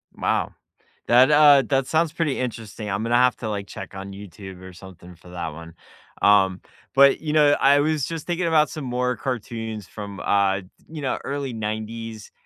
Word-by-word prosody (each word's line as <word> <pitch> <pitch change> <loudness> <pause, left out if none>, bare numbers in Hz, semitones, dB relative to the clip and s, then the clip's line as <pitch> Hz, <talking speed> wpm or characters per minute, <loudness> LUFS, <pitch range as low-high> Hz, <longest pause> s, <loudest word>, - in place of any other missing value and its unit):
Wow, - - -1 0.5
that, 125 +4 +6
uh, 145 -2 +7
that 135 -2 +1
sounds 160 0 +1
pretty 165 -5 -1
interesting, 115 -3 -5
I'm 100 +3 -2
gonna 120 +1 +1
have 125 0 +4
to, 110 - -5
like, 100 -1 -4
check 95 -1 -9
on 95 0 -7
YouTube 95 -1 -11
or 95 0 -11
something 90 -1 -13
for 85 +2 -17
that 85 -2 -5
one, 85 +1 -11 0.5
um, 95 -2 +4 0.3
but, 140 +1 +6
you 150 -1 -3
know, 150 -2 +5
I 140 +1 +5
was 150 -2 0
just 165 -2 -6
thinking 175 0 -1
about 155 -2 +3
some 150 -4 -6
more 125 0 -1
cartoons 115 -4 -5
from, 100 -2 -8
uh, 100 -1 +1
di - - -16 0.3
you 155 -1 -7
know, 135 -2 -2
early 140 -3 -4
90s, 110 0 -5
115 Hz, 190 wpm, -23 LUFS, 100-140 Hz, 0.5 s, uh